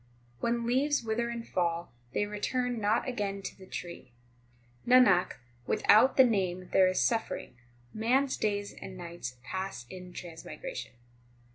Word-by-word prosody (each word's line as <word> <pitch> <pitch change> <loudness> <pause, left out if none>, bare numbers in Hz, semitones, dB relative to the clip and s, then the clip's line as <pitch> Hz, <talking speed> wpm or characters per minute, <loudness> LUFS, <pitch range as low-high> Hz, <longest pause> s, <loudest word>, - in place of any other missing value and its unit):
8 - - -29
When 235 0 0
leaves 270 +3 +2
wither 230 +1 -1
and 235 -1 -5
fall, 170 -3 -1 0.2
they 205 - 0
return 240 +3 -2
not 210 +5 +2
again 200 -5 -2
to - - -6
the 190 - -14
tree. 170 -10 -8 0.7
Nanak, 240 -8 +6 0.3
without 235 +5 +5
the 265 - +10
Name 185 -6 0
there 190 -1 +6
is 185 - +1
suffering; 225 - -1 0.4
man 240 +5 +3
s 275 - -2
days 205 -1 -1
and 185 - -9
nights 170 -8 -7
pass 190 -3 -4
in 180 -1 -9
transmigration. 180 - -7
205 Hz, 145 wpm, -30 LUFS, 180-235 Hz, 0.7 s, the